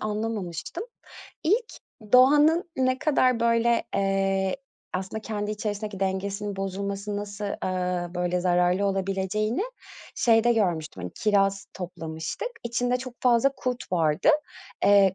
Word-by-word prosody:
anlamamıştım. 215 - -3 0.6
İlk 440 +8 +1 0.4
doğanın 295 +7 +6
ne 255 0 +2
kadar, 260 -5 +2
böyle, 235 0 +3
eee, 195 -1 +1 0.4
aslında 190 +4 -3
kendi 210 -1 -3
içerisindeki 210 -1 -4
dengesinin 200 +1 -2
bozulması 200 +1 -3
nasıl, 205 0 -5 0.2
ııı, 180 -1 -2
böyle 180 0 0
zararlı 180 +2 +2
olabileceğini 195 - -1 0.5
şeyde 230 0 +4
görmüştüm, 165 - -1
hani, 90 - -5
kiraz 195 -2 +1
toplamıştık. 165 - -5 0.2
İçinde 245 +1 0
çok 255 -1 -7
fazla 245 +2 +4
kurt 250 -5 -4
vardı. 160 - +2 0.6
Eee, 200 -2 +6
200 Hz, 110 wpm, -26 LUFS, 185-235 Hz, 0.6 s, doğanın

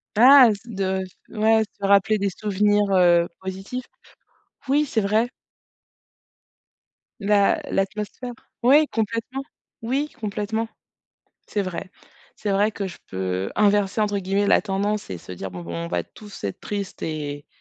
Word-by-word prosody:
Ah, 255 +2 +9
se 200 - -9
de 190 -2 -1 0.3
ouais, 220 0 +3 0.2
se 200 - -2
rappeler 200 +2 +4
des 200 0 0
souvenirs, 205 +1 +1
heu, 175 -2 +5
positifs. 195 +7 -6 0.8
Oui, 295 +2 +3
c'est 230 - 0
vrai. 215 +4 +2 1.9
L'a 205 -1 +3
l'atmosphère 210 +5 -2 0.3
oui 290 +5 +6
complètement. 230 +4 -2 0.4
Oui 270 +6 -1
complètement. 220 +1 -2 0.8
C'est 205 - -1
vrai. 185 0 -5 0.5
C'est 210 - -3
vrai 205 +2 +2
que 200 -1 -4
je 175 - -10
peux 95 0 -2
inverser 205 0 +2
entre 205 -1 +1
guillemets 195 +2 0
«la - - +5
tendance» 205 +1 -2
et 90 - -4
se - - -13
dire: 90 +1 -6
«Bon 90 - -7
bon 85 0 -7
on - - -5
va 90 0 -1
tous 205 - -13
être 100 - -3
tristes» 200 -2 -5
et 145 -2 -4
205 Hz, 145 wpm, -23 LUFS, 190-220 Hz, 1.9 s, Ah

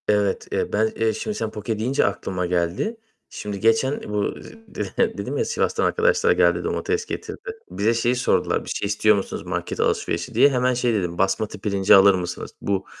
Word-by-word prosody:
Evet, 105 -2 +1
eee, - - -2
ben, 110 +1 +2
eee, 110 0 +1
şimdi 215 - -4
sen 110 - -3
"poke" 105 +1 -4
deyince 130 +5 +1
aklıma 95 -2 -2
geldi. 90 - -1 0.3
Şimdi 105 -1 -6
geçen 115 +6 +2
bu 105 -1 -1 0.3
dedi - - -5 0.2
dedim - - -3
ya, 460 - +1
"Sivas'tan 470 - 0
arkadaşlar 475 +1 +2
geldi, - - +3
domates 435 +2 -1
getirdi." - - -6 0.3
Bize 110 +3 +1
şeyi 120 +2 +1
sordular: 125 - +1
"Bir - - -8
şey - - -2
istiyor 105 +1 +3
musunuz 100 - -4
market - - -4
alışverişi?" - - -1
diye. 140 - +6
Hemen 125 -1 +1
şey 120 -1 +1
dedim: 90 -5 -2
"Basmati 95 +2 0
pirinci 100 -1 +4
alır 100 +1 +7
mısınız?" 90 -1 -5
Bu, 100 -1 -1
105 Hz, 180 wpm, -23 LUFS, 100-125 Hz, 0.3 s, alır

